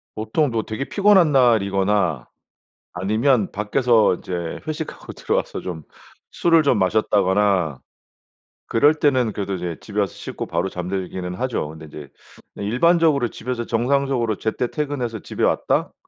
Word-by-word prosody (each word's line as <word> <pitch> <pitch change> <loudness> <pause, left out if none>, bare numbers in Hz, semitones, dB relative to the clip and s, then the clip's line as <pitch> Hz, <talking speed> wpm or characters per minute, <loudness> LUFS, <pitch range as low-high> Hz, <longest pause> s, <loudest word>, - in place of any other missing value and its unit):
보통 110 +7 0
뭐 115 -1 0
되게 110 +5 -5
피곤한 195 -5 +4
날이거나 100 - +2 0.7
아니면 110 +4 +1
밖에서 110 +1 +2
이제 85 -2 -5
회식하고 155 0 -6
들어와서 - - -2
좀 85 -4 -6 0.5
술을 165 -2 +3
좀 140 -6 +2
마셨다거나 95 -5 +2 0.9
그럴 145 +7 +3
때는 130 -7 +2
그래도 100 -1 -3
이제 85 -3 -4
집에 105 -1 -4
와서 100 -2 0
씻고 - - -7
바로 85 +3 -1
잠들기는 90 -1 -4
하죠. 125 - -2
근데 80 0 -10
이제 75 -2 -10 0.5
네 - - -6
일반적으로 150 +3 +3
집에서 120 +1 -5
정상적으로 120 -2 0
제때 115 +2 -2
퇴근해서 140 -7 -3
집에 - - -5
왔다? - - +1
110 Hz, 330 characters per minute, -21 LUFS, 95-135 Hz, 0.9 s, 피곤한